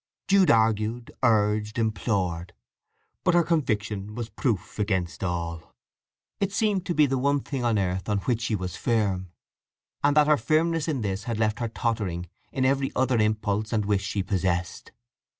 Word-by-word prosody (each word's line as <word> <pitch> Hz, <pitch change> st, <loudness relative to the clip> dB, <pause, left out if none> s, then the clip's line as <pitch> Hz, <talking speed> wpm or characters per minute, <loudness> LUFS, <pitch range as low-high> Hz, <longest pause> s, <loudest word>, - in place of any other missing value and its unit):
Jude 195 Hz, -3 st, +5 dB
argued, 110 Hz, +1 st, +2 dB
urged, 105 Hz, -2 st, +2 dB
implored; 95 Hz, -6 st, -1 dB, 0.7 s
but 180 Hz, -, +3 dB
her 175 Hz, -, +5 dB
conviction 105 Hz, -, -1 dB
was 115 Hz, -3 st, -5 dB
proof 110 Hz, -, -2 dB
against 95 Hz, -4 st, -1 dB
all. 85 Hz, -2 st, -4 dB, 0.6 s
It 200 Hz, -1 st, 0 dB
seemed 200 Hz, -3 st, 0 dB
to 175 Hz, -, -1 dB
be 150 Hz, -, +6 dB
the 135 Hz, -1 st, 0 dB
one 140 Hz, +1 st, +2 dB
thing 130 Hz, -1 st, -4 dB
on 115 Hz, -2 st, +2 dB
earth 95 Hz, 0 st, -1 dB
on 105 Hz, -, +2 dB
which 120 Hz, 0 st, 0 dB
she 110 Hz, 0 st, 0 dB
was 90 Hz, -2 st, -4 dB
firm, 100 Hz, -6 st, 0 dB, 0.7 s
and 145 Hz, +1 st, +3 dB
that 150 Hz, -, +7 dB
her 150 Hz, 0 st, +4 dB
firmness 160 Hz, +5 st, +1 dB
in 145 Hz, -6 st, -1 dB
this 100 Hz, -1 st, -3 dB
had 115 Hz, -2 st, -2 dB
left 110 Hz, +1 st, 0 dB
her 120 Hz, -, -1 dB
tottering 105 Hz, -7 st, -2 dB, 0.2 s
in 130 Hz, -1 st, 0 dB
every 135 Hz, 0 st, +1 dB
other 130 Hz, -2 st, +2 dB
impulse 105 Hz, 0 st, 0 dB
and 110 Hz, -3 st, +1 dB
wish 100 Hz, -1 st, +1 dB
she 100 Hz, 0 st, -2 dB
possessed. 95 Hz, -3 st, -2 dB
110 Hz, 170 wpm, -26 LUFS, 100-135 Hz, 0.7 s, that